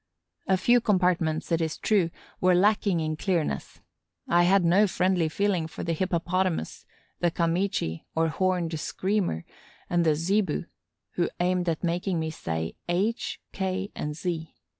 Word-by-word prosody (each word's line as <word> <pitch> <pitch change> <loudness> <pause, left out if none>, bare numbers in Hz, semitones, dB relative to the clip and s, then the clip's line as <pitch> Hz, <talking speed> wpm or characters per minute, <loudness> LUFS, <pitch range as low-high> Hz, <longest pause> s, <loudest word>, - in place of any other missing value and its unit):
A 190 - +3
few 240 +6 +4
compartments, 180 -6 +1
it 165 0 +2
is 160 -1 -2
true, 195 -6 +2 0.3
were 185 0 +4
lacking 200 -1 +3
in 155 0 -1
clearness. 160 - -2 0.5
I 175 +1 +4
had 190 0 +4
no 190 +5 +5
friendly 180 -3 +1
feeling 185 -2 0
for - - -7
the 170 - -1
Hippopotamus, 180 - -1 0.3
the 175 - +3
Kamichi, 170 - -1
or 165 0 +3
Horned 175 -2 0
Screamer, 185 - -1 0.5
and 175 -1 +3
the 155 -2 +3
Zebu, 185 +4 0 0.5
who 175 - +2
aimed 180 0 +1
at 160 +1 -2
making 175 +1 0
me 160 0 -2
say 80 - -3 0.2
H, 200 +7 0
K, 190 +1 -2
and 150 0 -4
Z. 165 -2 -4
175 Hz, 145 wpm, -27 LUFS, 160-190 Hz, 0.5 s, no